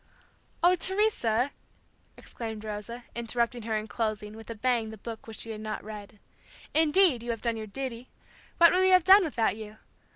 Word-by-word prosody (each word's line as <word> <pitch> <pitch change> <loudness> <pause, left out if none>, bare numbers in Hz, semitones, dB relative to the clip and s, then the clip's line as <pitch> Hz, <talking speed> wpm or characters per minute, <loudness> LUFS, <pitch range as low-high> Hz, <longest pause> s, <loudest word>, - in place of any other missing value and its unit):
"Oh, 355 +1 +6
Teresa," 335 - +1 0.7
exclaimed 220 -2 -7
Rosa, 215 +3 -6
interrupting 235 +1 -1
her 220 0 -2
and 215 0 -3
closing, 215 -2 -3
with 225 +1 -12
a 230 - -5
bang 235 -1 0
the 220 - -9
book 225 +2 -8
which 225 - -6
she 230 - -2
had 215 -1 -6
not 215 0 -5
read. 210 0 -9 0.6
"Indeed, 315 -3 +4
you 240 - -7
have 230 -2 -2
done 235 -2 0
your 215 -1 -6
duty. 250 +2 -5 0.5
What 340 -1 +7
would 365 - +3
we 375 - +4
have 370 -2 +6
done 385 +2 +8
without 235 -10 0
you? 215 -1 -9
230 Hz, 185 wpm, -28 LUFS, 220-285 Hz, 0.7 s, done